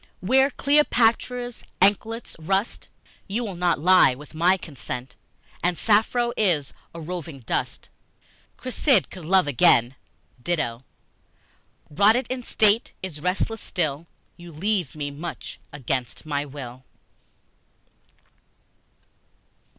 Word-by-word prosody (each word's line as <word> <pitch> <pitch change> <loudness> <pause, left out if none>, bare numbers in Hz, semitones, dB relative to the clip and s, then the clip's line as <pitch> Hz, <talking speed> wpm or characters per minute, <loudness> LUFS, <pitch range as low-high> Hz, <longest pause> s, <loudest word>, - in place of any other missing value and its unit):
Where 265 +8 +3
Cleopatra's 245 -4 +1 0.2
anklets 220 +4 +1
rust 195 +7 -2 0.4
You 215 +5 -2
will 200 -5 -5
not 175 0 +1
lie 175 -4 +5
with 150 +4 -13
my 175 +4 +3
consent; 130 -6 -7 0.5
And 175 -1 +1
Sappho 230 +5 +2
is 165 -10 +1 0.2
a 170 - -9
roving 165 -4 -6
dust; 115 - -3 0.7
Cressid 255 - +1
could 180 -4 -10
love 185 +1 +4
again; 120 -2 +4 0.5
Dido, 130 -7 -2 1.1
Rotted 215 - +4
in 255 -1 -3
state, 220 -1 +2
is 160 -6 -6
restless 195 +5 -1
still; 155 -2 -2 0.3
You 175 0 -11
leave 180 -1 -1
me 145 -2 -4
much 155 +5 -7
against 130 -1 -4
my 145 -1 -2
will. 130 -3 -9
180 Hz, 105 wpm, -24 LUFS, 145-220 Hz, 1.1 s, lie